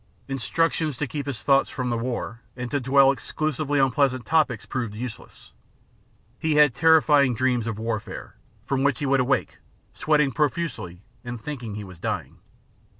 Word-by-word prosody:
Instructions 140 +3 0
to 150 - -1
keep 145 +1 -5
his 125 -4 -4
thoughts 135 -1 +3
from 125 -2 -3
the 120 - 0
war 120 -1 -4 0.2
and 125 0 -5
to 145 - +1
dwell 135 +1 +5
exclusively 145 0 -2
on 135 -1 +3
pleasant 130 -2 +1
topics 150 -8 +1
proved 115 -5 -4
useless. 115 0 -8 0.9
Hef 160 -1 +1
had 150 -3 +5
terrifying 150 -3 +4
dreams 125 -1 +1
of 110 -2 -3
warfare, 110 -1 -5 0.3
from 135 -1 0
which 140 -2 +2
he 145 - -3
would 135 0 +3
awake, 130 +2 0 0.3
sweating 150 -3 +2
profusely, 140 - -2 0.2
and 120 -1 -6
thinking 120 -5 -6
he 105 - -5
was 90 -4 -12
dying. - - -4
135 Hz, 160 wpm, -24 LUFS, 120-145 Hz, 0.9 s, dwell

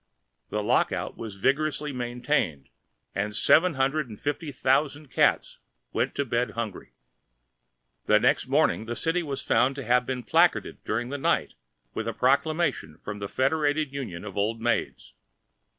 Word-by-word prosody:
The 105 0 -2
lock - - +2
out - - -3
was 110 -3 -7
vigorously 145 +6 0
maintained, 120 - -1 0.4
and 105 +1 -2
seven 165 +8 +4
hundred 135 +1 0
and 105 - -10
fifty 145 +1 -3
thousand 140 +2 0
cats - - +2 0.3
went - - 0
to 140 - 0
bed 120 0 -1
hungry! 110 -5 -5 1.1
The - - +5
next - - +2
morning 90 +6 +2
the 120 - -3
city 165 +5 0
was 140 -5 -4
found 135 +2 +2
to 140 - -5
have 125 +2 +3
been 130 -2 -3
placarded - - +2
during 120 +3 -2
the 145 +1 -4
night - - +1 0.4
with 110 - -3
a 115 - -1
proclamation 140 - +1
of 105 0 -5
the 100 -1 -5
Federated 145 +1 +1
Union 105 -11 -5
of 100 - -8
Old 110 +3 0
Maids. 120 +1 -2
130 Hz, 155 wpm, -26 LUFS, 110-145 Hz, 1.1 s, The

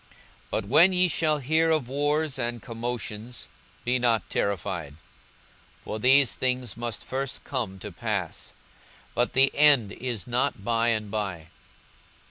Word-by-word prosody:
42:021:009 - - -30 0.4
But - - -2
when 160 - +6
ye 180 0 +4
shall 155 -3 +1
hear 160 +4 +2
of 155 -6 +1
wars 145 +1 0
and 120 -1 -2
commotions, 115 0 -5 0.4
be 125 +1 +1
not 115 -5 +1
terrified: 90 -6 -2 0.9
for 110 - -5
these 130 +2 +5
things 125 -4 -1
must 120 -1 -4
first 135 +1 -3
come 115 -8 -3
to 105 +2 -8
pass; 100 -2 -3 0.6
but 120 +1 0
the 135 +1 +4
end 140 -8 +5
is 120 -5 -4
not 120 -4 -1
by 115 0 +1
and 110 -3 0
by. 95 -7 -4
120 Hz, 140 wpm, -26 LUFS, 105-135 Hz, 0.9 s, when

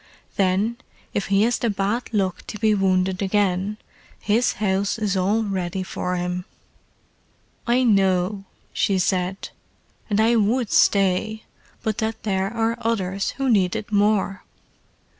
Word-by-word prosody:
Then, 200 +4 +1 0.4
if 200 - -1
he 195 +1 +3
has 235 +2 +1
the 235 - 0
bad 205 +5 -2
luck 195 -5 0
to - - -6
be 215 0 +2
wounded 185 -1 +1
again, 195 0 0 0.4
his 225 +4 +1
house 200 +1 0
is 210 -3 -1
all 200 +4 +1
ready 190 -2 -2
for 180 0 -3
him." 180 0 -3 1.2
"I 245 +2 +3
know," 195 -2 +2 0.3
she 195 - +1
said. 185 +1 -1 0.6
"And 205 0 +1
I 230 +2 +4
would 225 +2 +1
stay, 200 +2 +2 0.4
but 220 +1 -1
that 220 0 -3
there 195 -1 -1
are 230 0 -1
others 195 -4 -1
who 270 -1 -1
need 195 -5 +3
it 215 -1 -5
more." 205 -2 +1
200 Hz, 140 wpm, -23 LUFS, 190-220 Hz, 1.2 s, I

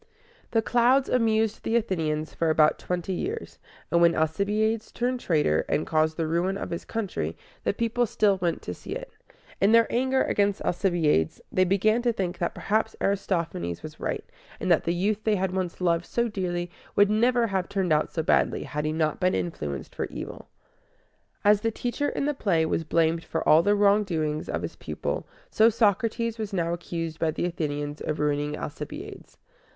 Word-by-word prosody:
"The 225 -1 +1
Clouds" 250 +4 +3
amused 225 -3 +2
the 225 - -1
Athenians 160 -9 -1
for 165 - 0
about 155 -1 +4
twenty 180 +1 -3
years; 425 - -4 0.3
and 170 - +3
when 170 0 +5
Alcibiades 210 +8 0
turned 250 +1 -1
traitor, 150 - +2
and - - +1
caused 155 0 +1
the 165 - 0
ruin 175 +5 0
of - - -5
his 170 - -4
country, 220 -4 -3 0.3
the - - +3
people 235 +1 0
still 205 -2 +2
went 175 -2 -1
to - - -4
see - - -7
it. - - -7 0.5
In 200 +3 +5
their 230 0 +7
anger 260 +2 +2
against 200 -1 +1
Alcibiades, 170 - +1
they 185 - +3
began 215 +5 +2
to 240 0 +2
think 185 -5 -3
that 170 - -1
perhaps 220 +1 0
Aristophanes 170 - -1
was - - -9
right, - - -3 0.3
and - - 0
that - - +3
the 170 - +1
youth 205 +4 0
they 215 -1 +2
had 190 -1 -1
once 185 -2 -3
loved 170 -1 +1
so 235 0 0
dearly 175 -4 -3 0.2
would 205 0 +5
never 240 +2 +3
have 190 -4 -1
turned 190 -5 +1
out 150 - +1
so 160 - -2
badly - - +2
had 150 +2 -4
he 155 - 0
not 155 -1 0
been 185 0 +2
influenced 75 - -4
for - - -2
evil. - - -8 1.0
As 205 0 +5
the 225 - +1
teacher 245 +5 -2
in - - -2
the 295 - +1
play 180 - +1
was 160 - -1
blamed 165 +1 +1
for 160 - -3
all 155 +2 +7
the 205 +4 +3
wrongdoing 195 -7 +2
of - - -2
his - - -5
pupil, - - -4 0.2
so 220 +1 +5
Socrates 230 +1 +1
was 215 -2 -4
now 170 -2 0
accused 165 -2 -4
by 165 - +1
the 160 +2 -2
Athenians 145 -3 -3
of 155 - -3
ruining 150 0 0
Alcibiades. 150 0 -8
185 Hz, 185 wpm, -26 LUFS, 160-220 Hz, 1.0 s, their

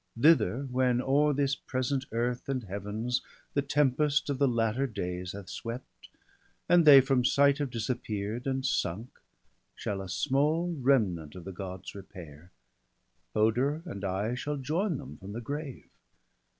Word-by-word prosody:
Thither, 130 - +4
when 125 -1 +2
o'er 145 +4 +3
this 140 -1 +1
present 130 +1 -2
earth 120 +3 -2
and 130 -3 -1
Heavens 105 +5 -3 0.3
The 140 - +2
tempest 145 +1 +2
of 135 - -3
the 140 - +4
latter 115 +2 +1
days 90 -4 -4
hath 100 -2 -8
swept. 115 +2 -8 0.6
And 175 -1 +5
they 140 -3 +10
from 130 -1 +1
sight 140 +2 +4
have 145 -2 -1
disappear'd, 115 -1 -3
and 130 0 -1
sunk, 110 -1 -1 0.7
Shall 100 -1 -3
a 95 - -7
small 155 - +1
remnant 95 - +1
of 90 - -8
the 95 - -5
Gods 95 0 -7
repair; 90 -5 -11 0.9
Hoder 125 +9 +2
and 105 - -7
I 100 +4 -1
shall 145 +4 -3
join 160 +6 -1
them 135 -1 -9
from 100 +1 -9
the 115 - -4
grave. 145 +2 -6
125 Hz, 150 wpm, -29 LUFS, 100-140 Hz, 0.9 s, they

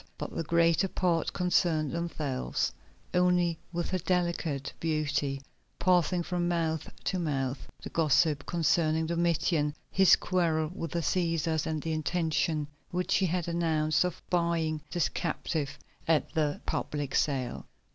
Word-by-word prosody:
But - - -6
the - - -1
greater 170 +2 +3
part 175 -3 0
concerned 165 -4 +1
themselves 150 - -2 0.4
only 180 -2 +3
with 175 0 -3
her 185 - 0
delicate 170 -5 -1
beauty, 150 -3 -1 0.3
passing 180 -1 +2
from 175 0 -1
mouth 165 -2 -1
to 185 - -1
mouth 135 -5 -2 0.2
the - - -7
gossip 150 -1 +3
concerning 160 -1 +2
Domitian, 165 -2 +1 0.2
his 190 -1 +7
quarrel 165 -4 0
with 165 -3 -4
the 170 - -1
Cæsars, 165 -2 0
and 155 -2 -2
the 160 - -1
intention 155 -1 0 0.2
which 180 +1 -1
he 190 - +2
had 175 0 -1
announced 160 -2 +2
of 180 -1 -4
buying 170 -3 +1
this 175 -3 +1
captive 150 -3 -3 0.3
at 160 -2 +2
the 150 -2 0
public 145 -2 -2
sale. 135 -4 0
165 Hz, 135 wpm, -29 LUFS, 155-175 Hz, 0.4 s, his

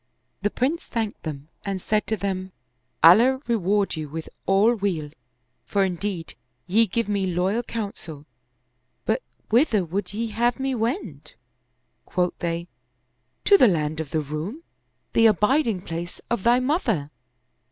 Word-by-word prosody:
The 205 - +1
Prince 275 +10 -1
thanked 225 -3 -3
them 150 -1 -6
and 195 -2 -2
said 210 +3 0
to 220 - 0
them, 190 -2 -3 0.2
" 130 +3 -27
Allah 235 +11 +7
reward 205 -3 +1
you 155 -2 -5
with 160 +2 -6 0.2
all 200 +5 +5
weal, 185 -9 -2 0.5
for 200 -1 +1
indeed 180 -2 -3 0.3
ye 220 +5 +3
give 230 +4 -1
me 200 -2 0
loyal 185 +6 +1
counsel; 200 -10 -6 0.8
but 225 +4 +1 0.3
whither 225 - +3
would 185 +3 -3
ye 225 +3 -2
have 240 +4 +1
me 265 0 0
wend?" 225 - -3 0.7
Quoth 180 -1 0
they, 170 0 -2 0.4
" - - -47
To 400 -1 +7
the 250 - +8
land 155 -4 0
of 160 -3 -4
the 155 - 0
Roum, 155 - -5 0.5
the 230 - +6
abiding 215 - +2
place 170 +1 -5
of 235 - +1
thy 240 +4 +4
mother." 245 - 0
200 Hz, 150 wpm, -24 LUFS, 170-230 Hz, 0.8 s, the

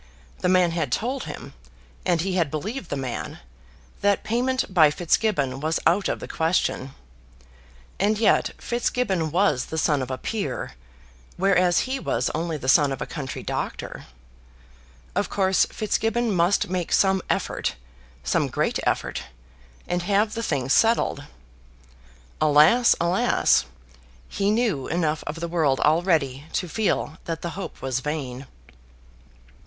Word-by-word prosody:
The 180 - +1
man 180 -2 +4
had 160 -6 -2
told 255 - -1
him, - - -8 0.5
and 175 -3 +2
he 190 +2 -2
had 170 -5 +1
believed 195 - -5
the 145 - -2
man, 130 -3 -4 0.6
that 200 -1 +2
payment 250 -1 -1
by 160 -5 +7
Fitzgibbon 155 - 0
was 155 +3 0
out 195 +4 +3
of - - -2
the - - -7
question. 160 -5 -1 1.0
And 210 +2 +2
yet 225 - +3
Fitzgibbon 235 -8 -1
was 160 -6 +2
the 160 - -6
son 150 -3 +2
of 130 - -4
a 130 - -3
peer, 170 - -3 0.7
whereas 185 -2 +3
he 265 +1 -2
was - - -1
only 165 0 -2
the 130 - -7
son 140 +1 +5
of 135 - -4
a - - -3
country 140 -5 -6
doctor! - - -5 1.1
Of - - -1
course 190 -1 +2
Fitzgibbon 225 +2 0
must 175 +2 +2
make 180 -1 -3
some 190 -1 +3
effort, - - -1 0.5
some 65 - +1
great - - -1
effort, - - -1 0.6
and 175 0 -1
have 205 +4 +1
the 230 - -3
thing 140 - -1
settled. 225 -6 +2 1.2
Alas, 155 +11 +5
alas! 175 - +3 0.6
He 200 0 -1
knew 215 - +1
enough 160 -2 -1
of 150 - -3
the 170 - -3
world 155 -6 +1
already 150 -4 +2
to 180 - -1
feel 175 -4 -1
that 165 -1 -4
the 170 - -3
hope 190 +4 -7
was 130 -1 -1
vain. 135 -3 -4
170 Hz, 140 wpm, -24 LUFS, 150-200 Hz, 1.2 s, by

